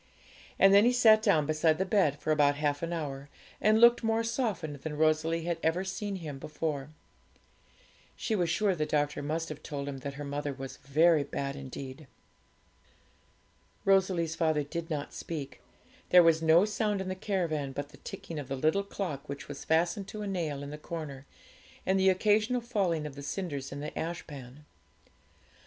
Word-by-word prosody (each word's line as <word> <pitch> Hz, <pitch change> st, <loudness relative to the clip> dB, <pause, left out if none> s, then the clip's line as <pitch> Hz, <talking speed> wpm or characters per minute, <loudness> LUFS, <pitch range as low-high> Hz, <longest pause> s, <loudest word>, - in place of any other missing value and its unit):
And 195 Hz, 0 st, +6 dB
then 200 Hz, +1 st, +8 dB
he 245 Hz, +2 st, +4 dB
sat 220 Hz, -3 st, +6 dB
down 180 Hz, -9 st, +3 dB
beside 155 Hz, +1 st, +2 dB
the 190 Hz, -, 0 dB
bed 180 Hz, -8 st, +2 dB
for 155 Hz, -, -1 dB
about 145 Hz, -2 st, +4 dB
half 145 Hz, -1 st, -1 dB
an 170 Hz, 0 st, -3 dB
hour, 145 Hz, -4 st, -4 dB, 0.3 s
and 215 Hz, +1 st, +4 dB
looked 235 Hz, +1 st, +6 dB
more 225 Hz, 0 st, +1 dB
softened 215 Hz, -, -2 dB
than 150 Hz, +2 st, -6 dB
Rosalie 160 Hz, +1 st, +2 dB
had 170 Hz, -1 st, -2 dB
ever 165 Hz, +3 st, +1 dB
seen 195 Hz, +1 st, -4 dB
him 155 Hz, -7 st, -6 dB
before. 150 Hz, -1 st, -3 dB, 1.3 s
She 220 Hz, -, -1 dB
was 175 Hz, -4 st, +1 dB
sure 195 Hz, +4 st, +2 dB
the 155 Hz, -3 st, -2 dB
doctor 145 Hz, -1 st, 0 dB
must 160 Hz, +3 st, -2 dB
have 155 Hz, -1 st, -7 dB
told 145 Hz, -2 st, -5 dB
him 135 Hz, -1 st, -5 dB
that 140 Hz, +1 st, -6 dB
her 145 Hz, -, -6 dB
mother 145 Hz, 0 st, -3 dB
was 135 Hz, 0 st, -8 dB
very 155 Hz, +3 st, +3 dB
bad 140 Hz, 0 st, -4 dB
indeed. 135 Hz, +1 st, -8 dB, 1.8 s
Rosalie's 185 Hz, -4 st, +3 dB
father 155 Hz, -2 st, +1 dB
did 165 Hz, +3 st, -5 dB
not 150 Hz, -2 st, -4 dB
speak; 145 Hz, -5 st, -6 dB, 0.5 s
there 180 Hz, -1 st, +8 dB
was 165 Hz, -1 st, +4 dB
no 165 Hz, +4 st, +5 dB
sound 210 Hz, -1 st, -1 dB
in 190 Hz, -, -4 dB
the 185 Hz, -, -1 dB
caravan 170 Hz, -8 st, -2 dB
but 145 Hz, +1 st, -5 dB
the 145 Hz, -, -15 dB
ticking 165 Hz, -3 st, -7 dB
of 140 Hz, -, -6 dB
the 135 Hz, -, -3 dB
little 155 Hz, +8 st, +2 dB
clock 180 Hz, -9 st, -5 dB
which 140 Hz, 0 st, -6 dB
was 145 Hz, -1 st, -7 dB
fastened 175 Hz, +5 st, +1 dB
to 210 Hz, +1 st, -6 dB
a -, -, -4 dB
nail 160 Hz, -7 st, -2 dB
in 140 Hz, -, -7 dB
the 150 Hz, -, -7 dB
corner, 150 Hz, -4 st, -7 dB, 0.6 s
and 190 Hz, +1 st, +2 dB
the 190 Hz, 0 st, +5 dB
occasional 215 Hz, +6 st, +2 dB
falling 195 Hz, -10 st, 0 dB
of 150 Hz, -, -6 dB
the 140 Hz, -, -9 dB
cinders 145 Hz, -3 st, -4 dB
in 140 Hz, +1 st, -6 dB
the 150 Hz, -, -4 dB
ashpan. 150 Hz, -4 st, -6 dB
160 Hz, 180 wpm, -30 LUFS, 145-190 Hz, 1.8 s, then